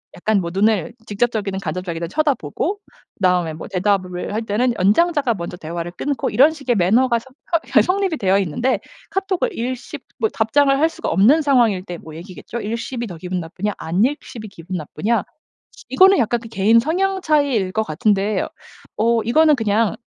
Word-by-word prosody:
약간 215 +3 +1
뭐 170 -2 -3
눈을 210 +3 +1
직접적이든 205 -3 -1
간접적이든 175 -3 -4
쳐다보고 295 - -1 0.4
그다음에 180 -3 +1
뭐 155 - -8
대답을 185 -1 -1
할 220 - -1
때는 235 +4 +1
연장자가 275 - +3
먼저 175 -3 -6
대화를 170 +1 -5
끊고 280 +10 -2
이런 275 +8 +5
식의 275 -6 -2
매너가 230 +6 +3
서 230 - -18 0.5
허 - - +8
성립이 375 -3 0
되어 195 -3 +2
있는데 200 - 0 0.3
카톡을 385 +4 -1
읽씹 250 +2 -5 0.2
뭐 440 - +1
답장을 275 - +2
할 315 +3 +3
수가 - - -5
없는 225 - +4
상황일 240 -10 +2
때 175 -2 -7
뭐 160 -1 -12
얘기겠죠. 185 +7 -8
읽씹이 235 +3 -4
더 175 -4 -8
기분 180 +2 -4
나쁘냐 185 +5 -4
안읽씹이 215 - -2
기분 180 0 -7
나쁘냐 200 +8 -1 0.5
시 - - -16
이거는 385 0 +6
약간 235 +1 +1
개인 220 +2 +4
성향 380 +9 0
차이일 280 - +1
것 220 - +1
같은데 205 +4 0 0.5
어 230 +1 +2
이거는 305 +6 +4
그냥 220 -2 +1
220 Hz, 365 characters per minute, -20 LUFS, 185-270 Hz, 0.5 s, 허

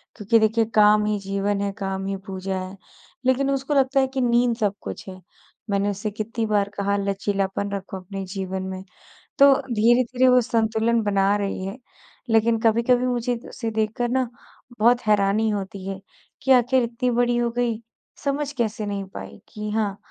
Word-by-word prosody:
क्योंकि 220 +1 +3
देखिए 220 +1 +2
काम 210 0 +5
ही 210 -1 0
जीवन 200 +1 -1
है, 200 0 -1
काम 195 -2 -3
ही 195 0 -2
पूजा 190 0 -3
है। 185 +1 -7 0.5
लेकिन 260 +2 +2
उसको 275 +2 -1
लगता 270 0 +3
है, 265 - +3
कि 265 0 -3
नींद 240 -1 +3
सब 205 -4 +1
कुछ - - -7
है। 185 0 -10 0.5
मैंने 200 0 +1
उससे 205 +2 -3
कितनी 220 +2 -3
बार 205 -2 +1
कहा 200 0 0
लचीलापन 200 0 -1
रखो 195 -1 -5
अपने 195 +1 -7
जीवन 190 0 -4
में 190 0 -6 0.6
तो 280 0 +8 0.2
धीरे-धीरे 240 +3 +3
वों 250 - +6
संतुलन 225 0 +1
बना 200 -1 +2
रही 195 -2 -3
है, 195 +5 -5 0.5
लेकिन 225 0 +3
कभी-कभी 235 +3 +3
मुझे 245 -1 0
उसे 225 -2 -4
देखकर 220 +2 -1
ना 260 0 +1 0.5
बहुत 240 +2 +4
हैरानी 210 +1 +3
होती 195 -2 -4
है, 195 -1 -4 0.4
कि 265 - +1
आख़िर 255 0 +4
इतनी 240 +1 -1
बड़ी 240 0 +2
हो 240 0 +1
गई, 235 -2 0 0.4
समझ 285 0 -1
कैसे 220 -2 -1
नहीं 200 -1 -3
पाई - - -9
कि 210 0 -5
हाँ 210 -2 -1
215 Hz, 175 wpm, -23 LUFS, 200-240 Hz, 0.6 s, तो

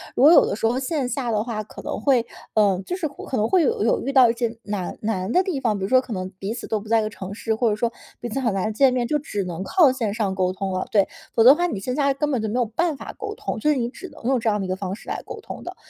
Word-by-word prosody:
如 - - +2
果 300 - +9
有 340 - +7
的 - - -2
时 225 - -2
候 240 +3 0
线 270 -1 -1
下 250 -1 -2
的 210 -1 +1
话 220 -2 -4
可 210 - -11
能 - - -4
会， 255 -5 +3 0.3
呃， 200 -4 +3
就 360 - -3
是 360 -4 -2
可 275 -2 -6
能 215 - +2
会 365 -3 +4
有 260 - +1
有 225 - +2
遇 275 - -3
到 255 -3 +7
一 - - +2
些 235 -1 -2
难 205 -3 -4
难 205 -2 -2
的 365 - +4
地 360 -7 -2
方， 225 -5 0
比 195 - -5
如 190 - -2
说 260 - +6
可 255 -3 -5
能 185 -1 -4
彼 200 +3 -3
此 235 - -7
都 220 - -1
不 210 - -12
在 225 +1 +3
一 - - 0
个 215 - -2
城 195 -2 -7
市， 220 +1 -2
或 230 +1 +2
者 210 - +1
说 230 +2 -1 0.3
彼 240 - -5
此 235 - -2
很 235 -6 0
难 195 +3 -1
见 260 +3 +4
面， 245 -2 0
就 300 - +1
只 210 -9 -3
能 180 0 -5
靠 320 - +4
线 230 -6 -2
上 205 -4 -1
沟 185 -1 +1
通 190 0 -3
了。 185 - -1
对， 200 -3 +4 0.3
否 225 - +4
则 245 - +9
的 - - +6
话 350 +2 0
你 215 - -3
线 250 +6 -3
下 280 -1 +2
根 295 +2 -1
本 255 -5 0
就 220 - -2
没 215 - -3
有 245 - +2
办 315 +9 -1
法 - - -8
沟 420 -1 -5
通， - - -4
所 300 - +2
以 275 - -1
你 235 -1 -1
只 320 +9 -9
能 - - -15
用 260 0 +2
这 230 - -3
样 210 -1 0
的 195 - -2
一 - - -6
个 185 - 0
方 190 -1 -4
式 - - -12
来 - - -3
沟 - - -8
通 - - -8
的。 - - -7
230 Hz, 360 characters per minute, -23 LUFS, 205-270 Hz, 0.3 s, 果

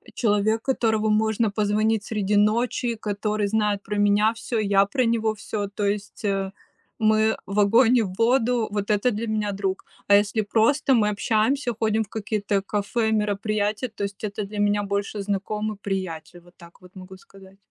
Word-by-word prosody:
человек, 215 0 +1
которому 220 -5 +1
можно 220 0 +1
позвонить 215 +1 +1
среди 210 -2 -1
ночи, 235 +3 +1
который 210 0 -2
знает 210 -1 0
про 210 +1 -4
меня 205 +2 +3
всё, 230 0 -3
я 200 -1 +3
про 255 +4 0
него 225 -1 +1
всё, 205 0 -4
то 205 - -2
есть, 200 +1 -3
э, 195 -1 -1 0.5
мы 220 0 +3
в 200 +1 -2
огонь 230 +4 +5
и 235 - +4
в 185 - -5
воду, 240 -1 +2
вот 205 -1 -3
это 210 +4 +2
для 225 +2 -3
меня 215 -1 -1
друг. 195 -1 -1 0.3
А 200 - +6
если 210 +2 +2
просто 235 +6 +2
мы 210 -3 +3
общаемся, 225 +5 0
ходим 220 0 +1
в 205 - -13
какие-то 205 -2 -2
кафе, 210 +3 -1
мероприятия, 210 +2 -1
то - - -4
есть 200 -1 -5
это 210 0 -3
для 205 +1 -6
меня 205 0 +2
больше 200 +1 -3
знакомый, 210 +2 -3
приятель, 180 -3 -5
вот 175 +1 -21
так 170 +1 -17
вот 180 +1 -17
могу 190 0 -11
сказать. 195 0 -17
210 Hz, 175 wpm, -24 LUFS, 200-220 Hz, 0.5 s, А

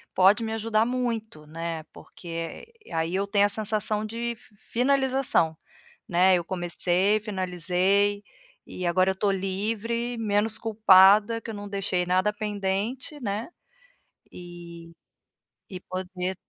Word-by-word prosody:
pode 200 +5 +5
me 220 - -3
ajudar 225 0 +1
muito, 230 -10 -3
né, 165 0 -5
porque 165 - -8 0.3
aí 165 +2 -1
eu 195 +1 0
tenho 200 0 +3
a 205 - +1
sensação 215 0 -1
de 235 +2 -4 0.4
finalização, 260 - +2 0.5
né. 185 +2 +4
Eu 175 - -2
comecei, 180 +3 +1
finalizei 190 +1 0 0.4
e 180 - -5
agora 185 +2 +3
eu - - -1
estou 200 +1 +1
livre, 220 +5 -2
menos 215 0 +1
culpada, 210 0 +5
que 225 - -8
eu 220 - -6
não 205 0 -7
deixei 185 -3 -1
nada 185 +3 +2
pendente, 210 +7 -3
né, 210 +1 -3 0.8
e 170 -1 -11 0.8
e 185 - -6
poder 185 0 -4
200 Hz, 125 wpm, -26 LUFS, 180-220 Hz, 0.8 s, pode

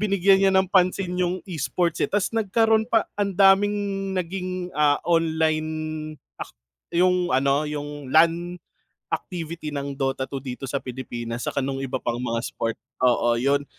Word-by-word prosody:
binigyan 195 -1 +4
niya 195 -1 +4
ng 190 -1 +3
pansin 185 -1 +2
yung 180 +1 -1
E-sports 170 0 -1
eh, - - +2
tas 205 +2 0
nagkaroon 220 +1 +2
pa 225 -3 +3
ang 200 -2 -2
daming 200 +1 +5 0.4
naging, 180 0 -3
ah, 145 -1 +3
online 160 -2 +1 0.7
ak - - -5 0.5
yung 180 0 +3
ano, 140 +2 +2
yung 145 -2 -6
LAN 170 +4 +3 0.6
activity 165 -3 -4
ng 140 -1 -4
Dota 135 -1 -1
2 135 - -4
dito 130 0 -7
sa 140 - -1
Pilipinas, 120 -2 -6
tsaka - - -2
no'ng 135 0 -2
iba 130 -1 -2
pang 120 +1 -3
mga 115 -2 -1
sport. 115 -1 -3 0.3
Oo, 120 -1 +3
'yon, 140 +4 +1
165 Hz, 150 wpm, -24 LUFS, 135-185 Hz, 0.7 s, daming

